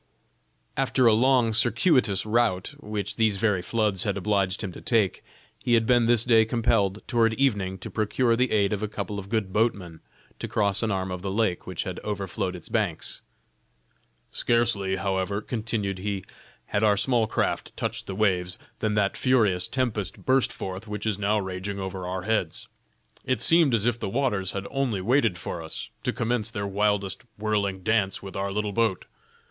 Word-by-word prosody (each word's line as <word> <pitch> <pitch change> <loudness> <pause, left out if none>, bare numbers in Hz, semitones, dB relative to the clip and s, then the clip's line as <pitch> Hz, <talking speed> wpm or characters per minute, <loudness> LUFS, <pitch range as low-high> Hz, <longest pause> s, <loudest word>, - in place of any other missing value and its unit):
After 135 -1 +2
a 115 - +7
long, 120 0 +3
circuitous 120 - +3
route, 110 -1 +1
which 105 -4 -4
these 110 -3 +2
very 105 -3 +1
floods 105 -1 0
had 100 0 -1
obliged 100 -1 0
him 95 - -3
to - - -11
take, 110 -6 +1 0.4
he 120 - +3
had 115 -1 +3
been 120 -1 +4
this 120 -1 +4
day 115 -3 +6
compelled, 110 -3 +1
toward 115 -2 +2
evening, 100 -9 +1
to - - -8
procure 115 +3 +1
the 125 +1 +1
aid 100 -1 +2
of 105 - -2
a 105 - -1
couple 100 -1 -4
of 100 0 -9
good 105 -4 -1
boatmen 100 -7 0 0.4
to - - -4
cross 100 -2 +2
an 110 - 0
arm 95 -2 -1
of 90 -1 -4
the 95 - -3
lake, 100 -3 0
which 90 -2 -3
had 90 -1 -5
overflowed 95 -2 -3
its 85 - -9
banks. 105 -8 -2 1.1
"Scarcely 110 -5 +1
however," 95 +1 -1
continued 105 -4 -3
he, 100 -1 -3 0.4
"had 105 - -1
our 105 -1 +4
small 120 0 +2
craft - - -2
touched - - -3
the 95 - -4
waves, 90 -3 +1 0.2
than 110 -1 0
that 100 -2 +1
furious 105 -9 +2
tempest 115 -8 -2
burst 130 0 +3
forth 95 +3 -6
which 105 0 -5
is 105 -2 -1
now 105 +1 +2
raging 95 +1 -4
over 95 -1 -5
our 90 0 -3
heads. 105 -6 -1 0.6
It 130 - 0
seemed 165 -7 +5
as 110 -1 0
if 120 -1 +1
the - - -3
waters 105 -6 0
had 100 0 -4
only 130 -7 0
waited 115 -2 +2
for 85 -1 -5
us, 80 - -7
to - - 0
commence 115 -1 -1
their 100 -3 -4
wildest 100 -1 0 0.2
whirling 100 -3 -1
dance 100 -2 +1
with 95 - -8
our 100 0 -2
little 105 0 -2
boat. 110 -3 +1
105 Hz, 180 wpm, -26 LUFS, 95-115 Hz, 1.1 s, a